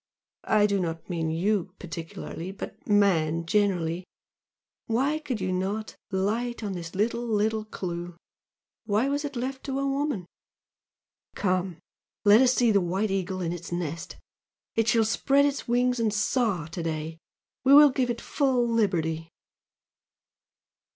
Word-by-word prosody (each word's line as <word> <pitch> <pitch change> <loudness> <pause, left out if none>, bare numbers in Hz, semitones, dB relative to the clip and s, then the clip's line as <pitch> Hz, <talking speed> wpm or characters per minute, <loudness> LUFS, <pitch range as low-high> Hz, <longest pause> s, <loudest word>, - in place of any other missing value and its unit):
I 210 -1 +4
do 200 -1 +1
not 165 -2 -3
mean 165 -2 -1
YOU 185 +3 0
particularly, 165 +1 -7
but 195 - -9
man 170 -6 +3
generally! 180 -3 +1 0.8
why 275 +7 +1
could 270 -7 -4
you 185 -1 -1
not 195 +4 -2
light 220 +5 -1
on 200 -2 -2
this 170 -2 -7
little, 230 +4 0
little 215 0 0
clue! 175 -4 -5 0.7
why 215 +5 +2
was 285 +1 -1
it 285 -1 -5
left 265 +2 -4
to 270 -1 -2
a 275 - 0
woman! 275 - -1 1.1
Come! 185 -3 0 0.5
let 210 +3 +8
us 255 -1 +5
see 240 -2 +4
the 200 -2 +4
White 190 +4 -1
Eagle 190 -1 -2
in 170 -1 -1
its 175 0 -8
nest, 170 -2 -4 0.6
it 225 -1 +1
shall 225 0 +4
spread 275 +5 +3
its 285 -1 -2
wings 245 +1 +2
and 225 -2 +2
soar 210 - 0
to 170 +1 -5
day 160 0 -4 0.4
we 270 +2 +7
will 295 -1 +9
give 255 -1 0
it 235 -1 -2
full 260 -4 +1
liberty!" 165 -8 0
205 Hz, 145 wpm, -27 LUFS, 175-240 Hz, 1.1 s, will